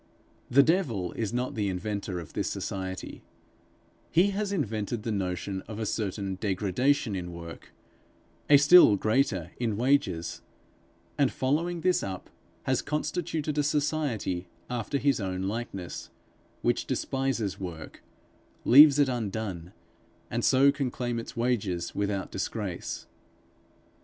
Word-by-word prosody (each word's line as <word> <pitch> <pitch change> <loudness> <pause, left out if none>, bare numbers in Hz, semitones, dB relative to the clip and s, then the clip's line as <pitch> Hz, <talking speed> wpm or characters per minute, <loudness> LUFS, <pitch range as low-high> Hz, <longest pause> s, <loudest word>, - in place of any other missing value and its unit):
The 140 +3 +6
devil 135 - +1
is 110 -2 -3
not 125 +1 -2
the 105 -3 -1
inventor 95 -1 -3
of 80 -3 -10
this - - -1
society; 95 -1 -5 0.9
he 185 +5 +4
has 200 0 -2
invented 115 - -2
the 115 - -2
notion 95 -1 -2
of 110 - -7
a 110 - -2
certain 100 -2 -2
degradation 105 +5 +1
in 90 -2 -4
work, 85 -1 -10 0.8
a 145 - +9
still 145 -5 +8
greater 110 - +1
in 115 -4 -1
wages; 130 - +1 0.8
and 140 -2 +4
following 165 +6 0
this 180 +2 +2
up, 95 -2 -6 0.3
has - - +1
constituted 155 0 -2
a - - +3
Society 145 - -1 0.2
after 120 +3 -1
his 140 -2 +2
own 95 -2 -3
likeness, 100 -3 -5 0.5
which - - +1
despises 130 -7 -1
work, 85 -5 -7 0.6
leaves 145 +3 +9
it 145 -1 +4
undone, 105 -7 -3 0.6
and 120 +1 -1
so 135 +1 +5
can 140 -2 -2
claim 120 -1 -3
its 115 - -8
wages 100 -8 -1
without 100 -1 -2
disgrace. 95 -1 -4
115 Hz, 125 wpm, -28 LUFS, 95-140 Hz, 0.9 s, a